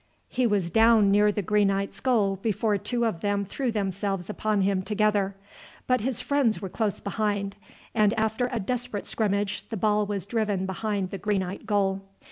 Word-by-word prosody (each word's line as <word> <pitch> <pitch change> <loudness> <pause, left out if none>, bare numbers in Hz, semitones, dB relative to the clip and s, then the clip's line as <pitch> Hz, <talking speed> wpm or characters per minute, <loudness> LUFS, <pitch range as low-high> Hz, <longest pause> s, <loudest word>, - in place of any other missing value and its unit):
He 250 -1 +1
was 195 -5 0
down 225 -1 +5
near 210 +1 +5
the 205 0 -2
Greenites' 200 0 +1
goal 210 -7 +2
before 210 +1 0
two 235 +3 -1
of 195 -8 -2
them 205 -1 0
threw 250 +5 -2
themselves 195 -2 -2
upon 210 -1 0
him 190 -1 +1
together; 205 -1 +1 0.5
but 255 -2 +2
his 250 0 -1
friends 280 -6 +1
were 195 - -5
close 205 +1 -1
behind, 205 -1 -2 0.4
and 210 -2 +4
after 220 +3 0
a 240 - -1
desperate 245 0 -3
scrimmage 205 -2 -1
the 225 - -3
ball 210 0 +2
was 200 -3 -3
driven 205 -3 -1
behind 195 0 -2
the 195 - -5
Greenite 195 +1 -2
goal. 195 -2 +1
205 Hz, 170 wpm, -26 LUFS, 195-220 Hz, 0.5 s, down